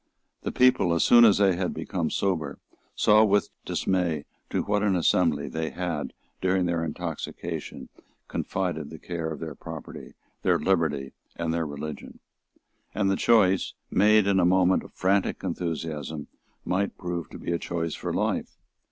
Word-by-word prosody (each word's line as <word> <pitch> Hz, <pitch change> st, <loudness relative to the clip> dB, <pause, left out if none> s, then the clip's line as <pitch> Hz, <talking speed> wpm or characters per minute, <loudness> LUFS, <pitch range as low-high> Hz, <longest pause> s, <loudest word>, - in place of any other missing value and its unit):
The -, -, -3 dB
people, 125 Hz, -9 st, +4 dB
as 85 Hz, -, +2 dB
soon 120 Hz, -1 st, +7 dB
as 105 Hz, -3 st, +6 dB
they 100 Hz, -3 st, +4 dB
had 90 Hz, 0 st, -2 dB
become -, -, -2 dB
sober, 80 Hz, -8 st, -1 dB, 0.4 s
saw 105 Hz, +1 st, +5 dB
with 105 Hz, -1 st, +2 dB
dismay 85 Hz, -6 st, 0 dB, 0.2 s
to -, -, 0 dB
what 105 Hz, 0 st, 0 dB
an 100 Hz, -3 st, +2 dB
assembly 80 Hz, -4 st, +2 dB
they 80 Hz, +3 st, -3 dB
had, 85 Hz, -4 st, -3 dB, 0.3 s
during 95 Hz, 0 st, +2 dB
their 85 Hz, -1 st, 0 dB
intoxication, 80 Hz, 0 st, -5 dB, 0.4 s
confided 85 Hz, -6 st, -3 dB
the 80 Hz, -, -9 dB
care 85 Hz, 0 st, -4 dB
of 80 Hz, -, -6 dB
their 80 Hz, -2 st, -5 dB
property, -, -, -9 dB, 0.3 s
their -, -, +3 dB
liberty 75 Hz, -8 st, 0 dB, 0.2 s
and 85 Hz, -1 st, -2 dB
their 85 Hz, -1 st, -1 dB
religion. 75 Hz, +1 st, -7 dB, 0.8 s
And 100 Hz, -1 st, +2 dB
the -, -, +2 dB
choice, 95 Hz, -4 st, +3 dB, 0.2 s
made 105 Hz, 0 st, +5 dB
in 100 Hz, -1 st, +3 dB
a -, -, +3 dB
moment 90 Hz, +1 st, +4 dB
of -, -, -13 dB
frantic 95 Hz, +1 st, 0 dB
enthusiasm, 80 Hz, -4 st, -3 dB, 0.4 s
might 100 Hz, +2 st, -1 dB
prove 90 Hz, -2 st, -4 dB
to -, -, -9 dB
be -, -, -4 dB
a 85 Hz, -, 0 dB
choice 85 Hz, -2 st, -3 dB
for -, -, -4 dB
life. -, -, -1 dB
90 Hz, 160 wpm, -26 LUFS, 80-95 Hz, 0.8 s, soon